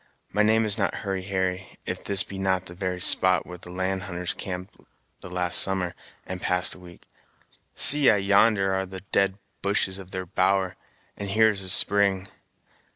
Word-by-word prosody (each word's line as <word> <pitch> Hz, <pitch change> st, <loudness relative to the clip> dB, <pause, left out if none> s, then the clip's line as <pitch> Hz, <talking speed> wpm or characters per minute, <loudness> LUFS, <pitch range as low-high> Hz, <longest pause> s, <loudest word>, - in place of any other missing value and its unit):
My 105 Hz, -, +2 dB
name 110 Hz, +1 st, +3 dB
is 110 Hz, +1 st, -1 dB
not 95 Hz, -, 0 dB
Hurry 95 Hz, -1 st, -2 dB
Harry, 95 Hz, -1 st, -3 dB
if -, -, -5 dB
this 100 Hz, 0 st, +1 dB
be 95 Hz, -, -9 dB
not 95 Hz, -1 st, -1 dB
the 85 Hz, -, -8 dB
very 90 Hz, 0 st, -4 dB
spot 95 Hz, +1 st, +3 dB
where 90 Hz, 0 st, -10 dB
the 90 Hz, -, -12 dB
land 95 Hz, +1 st, -3 dB
hunters 90 Hz, -1 st, -4 dB
camped 90 Hz, +1 st, -7 dB, 0.4 s
the -, -, -11 dB
last 90 Hz, -1 st, +1 dB
summer, 95 Hz, -2 st, -1 dB, 0.3 s
and 90 Hz, -1 st, -7 dB
passed 90 Hz, 0 st, +2 dB
a -, -, -14 dB
week. 90 Hz, -1 st, -15 dB, 0.7 s
See 145 Hz, -2 st, +6 dB
I -, -, +5 dB
yonder 100 Hz, 0 st, +3 dB
are 95 Hz, 0 st, -2 dB
the 95 Hz, 0 st, -9 dB
dead 100 Hz, -1 st, +1 dB, 0.2 s
bushes 100 Hz, -1 st, 0 dB
of 95 Hz, -2 st, -11 dB
their 95 Hz, -1 st, -5 dB
bower, 95 Hz, +1 st, 0 dB, 0.4 s
and 100 Hz, -1 st, -4 dB
here 110 Hz, +2 st, +4 dB
is 100 Hz, -2 st, -3 dB
the 95 Hz, -, +1 dB
spring. 95 Hz, 0 st, +3 dB
95 Hz, 185 wpm, -25 LUFS, 90-100 Hz, 0.7 s, See